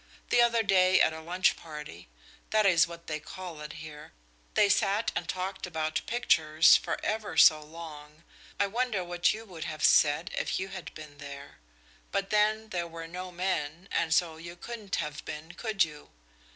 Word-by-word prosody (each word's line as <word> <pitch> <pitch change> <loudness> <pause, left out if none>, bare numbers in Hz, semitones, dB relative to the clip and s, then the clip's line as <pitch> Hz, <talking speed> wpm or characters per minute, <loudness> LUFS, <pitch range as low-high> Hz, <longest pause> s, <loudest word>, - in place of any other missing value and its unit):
The 240 - +5
other 235 -1 +3
day 185 -2 +4
at 160 - +4
a 160 - -7
lunch 180 +4 +1
party 150 - -10 0.4
that 215 -1 +3
is 170 -4 +5
what 170 0 -11
they 155 -1 -3
call 170 0 -9
it 150 - -7
here 155 -1 -10 0.4
they 210 - +5
sat 200 +2 +2
and - - -3
talked 190 +1 -3
about 155 -2 -2
pictures 160 -9 +5
for - - 0
ever 210 -6 -2
so 155 -1 +7
long. 155 -1 -11 0.4
I 200 - +4
wonder 220 -1 -1
what 175 0 +1
you 220 +1 -6
would 175 -6 -8
have 155 -2 -5
said 150 +4 +4
if - - -1
you 190 +1 -4
had 190 -2 -8
been 150 -2 -11
there! 140 - -10 0.5
but 200 0 -2
then 215 +1 +2
there 175 -4 -2
were 165 0 -8
no 180 +2 -7
men, 175 -1 -2
and 165 -1 0
so 160 0 +2
you 170 +1 -9
couldn't 210 +1 -5
have 150 0 -4
been, 155 +2 -7
could 215 -1 +1
you? 150 -2 -8
175 Hz, 180 wpm, -29 LUFS, 155-195 Hz, 0.5 s, so